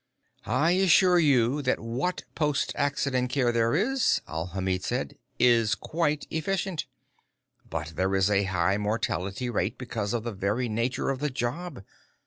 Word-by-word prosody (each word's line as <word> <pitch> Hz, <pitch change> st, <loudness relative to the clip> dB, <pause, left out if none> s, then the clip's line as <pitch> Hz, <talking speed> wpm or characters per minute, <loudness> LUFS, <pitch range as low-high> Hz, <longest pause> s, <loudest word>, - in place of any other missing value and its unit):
"I 135 Hz, +10 st, +2 dB
assure 180 Hz, -1 st, +5 dB
you 140 Hz, -3 st, +3 dB
that 130 Hz, -2 st, 0 dB
what 125 Hz, +11 st, -2 dB
post 150 Hz, -2 st, 0 dB
accident 140 Hz, -3 st, 0 dB
care 125 Hz, -3 st, +1 dB
there 115 Hz, +1 st, +2 dB
is," 250 Hz, +9 st, +2 dB
Alhamid 90 Hz, +3 st, -2 dB
said, -, -, -3 dB, 0.2 s
"is 115 Hz, -3 st, +4 dB
quite 150 Hz, 0 st, -1 dB
efficient. 180 Hz, +1 st, -2 dB, 0.8 s
But 75 Hz, -, -4 dB
there 95 Hz, +3 st, 0 dB
is 95 Hz, 0 st, +3 dB
a 100 Hz, -1 st, +2 dB
high 95 Hz, +1 st, +1 dB
mortality 105 Hz, 0 st, -2 dB
rate 105 Hz, -4 st, -1 dB
because 115 Hz, -4 st, -3 dB
of 115 Hz, -, -2 dB
the 120 Hz, -, -3 dB
very 105 Hz, +6 st, -1 dB
nature 120 Hz, +5 st, -1 dB
of 135 Hz, -, -3 dB
the 150 Hz, +1 st, -1 dB
job. 130 Hz, -, -4 dB
120 Hz, 145 wpm, -27 LUFS, 105-150 Hz, 0.8 s, assure